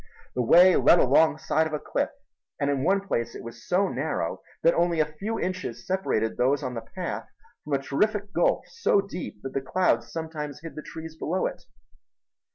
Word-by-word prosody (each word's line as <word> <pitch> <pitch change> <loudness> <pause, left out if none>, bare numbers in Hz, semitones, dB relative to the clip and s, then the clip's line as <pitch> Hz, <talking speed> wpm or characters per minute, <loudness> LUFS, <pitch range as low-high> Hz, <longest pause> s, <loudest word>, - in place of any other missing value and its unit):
The 125 - 0
way 175 +9 +7
led 175 - +6
along 155 +3 +5
the - - -13
side 160 +1 +2
of 155 - -8
a 150 - -1
cliff, - - -1 0.5
and 140 0 +1
in 135 -2 -1
one 195 +4 +3
place 120 -12 -2
it - - -8
was 115 0 -10
so 190 +2 +3
narrow 155 -1 -2 0.2
that 165 - +6
only 170 -1 +1
a 155 - +4
few 195 +10 -4
inches 185 0 -4
separated 185 - 0
those 135 +3 +2
on 130 -1 -3
the 115 - -4
path 180 +11 -5 0.4
from 150 - -4
a - - +4
terrific 205 +8 0
gulf - - +2
so 465 - +2
deep 180 - -7
that 135 - -5
the 135 - -1
clouds 180 +7 +1
sometimes 155 -3 -5
hid 165 -1 -8
the 155 - -7
trees 160 0 -8
below 175 +3 -1
it. 180 - -5
160 Hz, 200 wpm, -26 LUFS, 140-185 Hz, 0.5 s, way